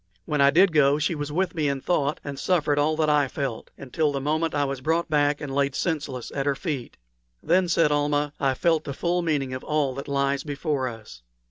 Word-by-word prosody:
When 150 Hz, -2 st, 0 dB
I 140 Hz, -, +7 dB
did 180 Hz, +4 st, +4 dB
go 145 Hz, -1 st, +4 dB
she 155 Hz, +3 st, 0 dB
was 145 Hz, -1 st, -4 dB
with 185 Hz, +4 st, 0 dB
me 155 Hz, -3 st, 0 dB
in 140 Hz, -1 st, -2 dB
thought 145 Hz, -1 st, 0 dB
and 140 Hz, -1 st, -6 dB
suffered 150 Hz, -5 st, +1 dB
all 155 Hz, +2 st, +2 dB
that 155 Hz, 0 st, +1 dB
I 150 Hz, -2 st, +3 dB
felt, 130 Hz, -3 st, -4 dB
until 145 Hz, +3 st, -1 dB
the 140 Hz, -, -2 dB
moment 155 Hz, +4 st, -1 dB
when 145 Hz, -, +1 dB
I -, -, +1 dB
was 135 Hz, -1 st, -4 dB
brought 165 Hz, +3 st, 0 dB
back 145 Hz, -1 st, +2 dB
and 140 Hz, -2 st, -5 dB
laid 140 Hz, -1 st, 0 dB
senseless 145 Hz, -7 st, -3 dB
at 135 Hz, 0 st, -2 dB
her 140 Hz, -, +2 dB
feet. 140 Hz, -5 st, -5 dB, 0.5 s
"Then," 180 Hz, +3 st, +3 dB
said 165 Hz, -3 st, +3 dB
Almah, 145 Hz, 0 st, 0 dB
"I 135 Hz, -2 st, +1 dB
felt 165 Hz, +2 st, +1 dB
the 140 Hz, -, -5 dB
full 175 Hz, +3 st, 0 dB
meaning 145 Hz, -6 st, -1 dB
of 130 Hz, -, -5 dB
all 150 Hz, -3 st, 0 dB
that 140 Hz, +2 st, -7 dB
lies 140 Hz, 0 st, 0 dB
before 145 Hz, -2 st, -2 dB
us." 110 Hz, -, -9 dB
145 Hz, 230 wpm, -25 LUFS, 140-155 Hz, 0.5 s, I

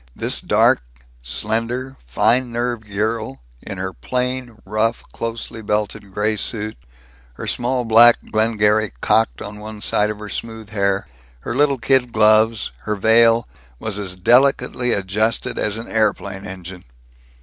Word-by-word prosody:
This -, -, -1 dB
dark, -, -, +3 dB, 0.4 s
slender, 115 Hz, -, -2 dB
fine 120 Hz, -, +2 dB
nerved 120 Hz, -2 st, -3 dB
girl, 105 Hz, -7 st, -2 dB, 0.2 s
in 100 Hz, -, -7 dB
her 95 Hz, 0 st, -4 dB
plain, 125 Hz, -2 st, -3 dB
rough, 110 Hz, +3 st, 0 dB
closely 115 Hz, 0 st, -5 dB
belted, 105 Hz, -1 st, -2 dB
gray 105 Hz, +2 st, 0 dB
suit, 110 Hz, +1 st, -2 dB, 0.6 s
her -, -, -7 dB
small 125 Hz, 0 st, -1 dB
black 115 Hz, +1 st, +7 dB
Glengarry 110 Hz, -1 st, +2 dB
cocked 115 Hz, +1 st, +2 dB
on 105 Hz, 0 st, -8 dB
one 105 Hz, 0 st, -8 dB
side 105 Hz, 0 st, +1 dB
of 105 Hz, -, -4 dB
her 105 Hz, 0 st, -8 dB
smooth 110 Hz, 0 st, -6 dB
hair, 100 Hz, -5 st, 0 dB, 0.3 s
her -, -, -4 dB
little 140 Hz, 0 st, +3 dB
kid 130 Hz, -1 st, +2 dB
gloves, 110 Hz, 0 st, +4 dB
her 105 Hz, -, -3 dB
veil, 115 Hz, +2 st, +4 dB, 0.3 s
was 105 Hz, -, -3 dB
as 95 Hz, -3 st, -4 dB
delicately 125 Hz, +4 st, +3 dB
adjusted 105 Hz, +3 st, 0 dB
as 105 Hz, 0 st, 0 dB
an 115 Hz, -, -7 dB
aeroplane 100 Hz, -3 st, -1 dB
engine. 95 Hz, -1 st, -9 dB
110 Hz, 140 wpm, -20 LUFS, 105-115 Hz, 0.6 s, black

